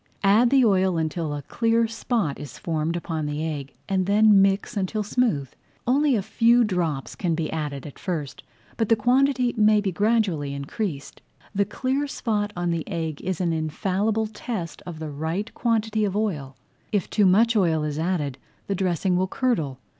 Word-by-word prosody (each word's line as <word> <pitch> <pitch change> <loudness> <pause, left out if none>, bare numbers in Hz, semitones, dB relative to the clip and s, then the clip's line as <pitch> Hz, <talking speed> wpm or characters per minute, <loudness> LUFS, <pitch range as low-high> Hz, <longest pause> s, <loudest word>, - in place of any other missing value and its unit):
Add 215 +5 +5
the 265 -1 +5
oil 190 -4 +3
until 160 0 -2
a 145 - -6
clear 230 - +1
spot 225 - -2
is 145 -4 -8
formed 160 0 -2
upon 160 -3 -3
the 150 +2 -2
egg, 145 -4 -5
and 190 -1 0
then 210 0 +6
mix 195 0 +2
[Page - - -12
30] 205 - -1
until 210 +3 -1
smooth. 205 - 0 0.4
Only 275 +2 +3
a 205 - 0
few 235 +4 +4
drops 170 -9 -1
can 170 -3 -1
be 160 -1 -2
added 145 -4 -4
at 145 - -10
first, 160 -7 -4 0.4
but 225 -3 0
the 225 - +6
quantity 250 +2 +2
may 215 -1 +5
be 200 -2 -1
gradually 190 -8 +1
increased. 145 +2 -5 0.3
The 200 0 +2
clear 265 +7 -1
spot 210 -6 -1
on 175 0 0
the 165 -1 -1
egg 160 -5 -3
is 185 -2 -3
an 175 -3 +1
infallible 190 +7 0
test 210 -5 -5
of 170 -3 -6
the 155 -1 -5
right 160 +9 -3
quantity 220 -2 0
of 200 -2 -1
oil. 150 -11 -2 0.4
If 205 -4 0
too 205 -3 +3
much 225 +5 +4
oil 165 -6 +2
is 150 0 -3
added 155 -6 -1 0.3
the 200 - -1
dressing 185 -1 0
will 185 +1 +1
curdle. 180 - -1
190 Hz, 185 wpm, -24 LUFS, 160-220 Hz, 0.4 s, then